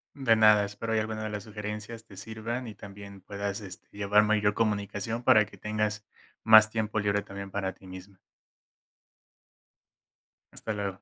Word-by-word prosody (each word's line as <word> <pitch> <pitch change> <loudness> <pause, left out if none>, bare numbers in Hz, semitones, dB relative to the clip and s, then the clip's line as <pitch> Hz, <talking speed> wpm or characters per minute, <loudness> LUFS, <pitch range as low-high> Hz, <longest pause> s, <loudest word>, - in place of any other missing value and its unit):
De 130 -5 +3
nada, 105 -1 +6
espero 105 +2 -4
y 110 - +3
alguna 110 0 -3
de 110 - -3
las 105 -1 -5
sugerencias 105 +1 -7
te 100 -4 -15
sirvan 110 +4 -5
y 110 - -8
también 100 0 -11
puedas, 100 +1 -4
este, 95 -2 -11
llevar 105 +1 +3
mayor 105 -1 +2
comunicación 105 +1 -2
para 110 -5 +6
que - - -16
tengas 105 0 -2 0.4
más 110 0 +8
tiempo 110 -1 -2
libre 100 0 0
también 100 0 -8
para 95 -1 -3
ti 95 - -17
misma. 95 +1 -11 2.3
Hasta 110 - -5
luego. 100 -1 -2
105 Hz, 160 wpm, -28 LUFS, 100-110 Hz, 2.3 s, más